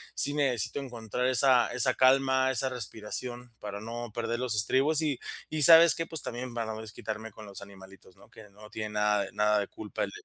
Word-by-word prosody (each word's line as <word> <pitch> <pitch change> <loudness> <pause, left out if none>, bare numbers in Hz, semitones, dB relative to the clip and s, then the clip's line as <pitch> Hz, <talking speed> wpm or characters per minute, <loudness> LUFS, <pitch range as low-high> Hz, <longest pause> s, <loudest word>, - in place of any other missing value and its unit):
sí 145 - +2
necesito 135 -2 -1
encontrar 125 -2 -5
esa 130 0 +3
esa 125 +1 +2
calma, 130 0 +3
esa 130 +1 -1
respiración 120 +1 -5
para 100 0 -7
no 120 0 -7
perder 120 +1 -3
los 125 -4 0
estribos, 135 +9 +3
¿y 145 -5 -1 0.3
y 155 -1 +1
sabes 165 +1 +9
qué?, 165 - -4
pues, 160 -4 -3
también 120 0 -6
para 115 -2 -4
no 110 - -8
desquitarme 110 0 -7
con 110 - -12
los 100 0 -9
animalitos, 95 -2 -15
¿no?, - - -20
que 105 -2 -15
no 105 +2 -15
tienen 110 -1 -6
nada 105 -1 +1
de - - -11
nada 105 0 +2
de 100 - -3
culpa 105 -1 -5
el - - -10
120 Hz, 205 wpm, -28 LUFS, 105-130 Hz, 0.3 s, sabes